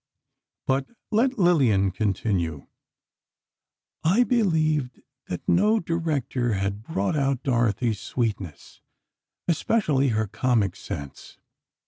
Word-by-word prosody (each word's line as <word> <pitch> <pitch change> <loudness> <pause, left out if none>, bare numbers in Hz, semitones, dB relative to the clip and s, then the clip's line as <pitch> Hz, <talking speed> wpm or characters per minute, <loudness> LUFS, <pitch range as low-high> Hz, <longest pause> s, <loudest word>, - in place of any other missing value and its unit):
But 135 0 0 0.2
let 250 +5 +2
Lillian 130 - +3
continue: 90 -6 -1 1.4
"I 195 +10 +4
believed 155 - +1 0.2
that 90 - -6
no 210 +5 +4
director 145 - -1
had 100 +1 -2
brought 100 -5 -1
out 135 -3 0
Dorothy's 120 -3 +1
sweetness, 100 - -4 0.7
especially 155 -5 +2
her 110 -3 +1
comic 110 -2 0
sense. 70 -1 -8
130 Hz, 90 wpm, -25 LUFS, 105-165 Hz, 1.4 s, I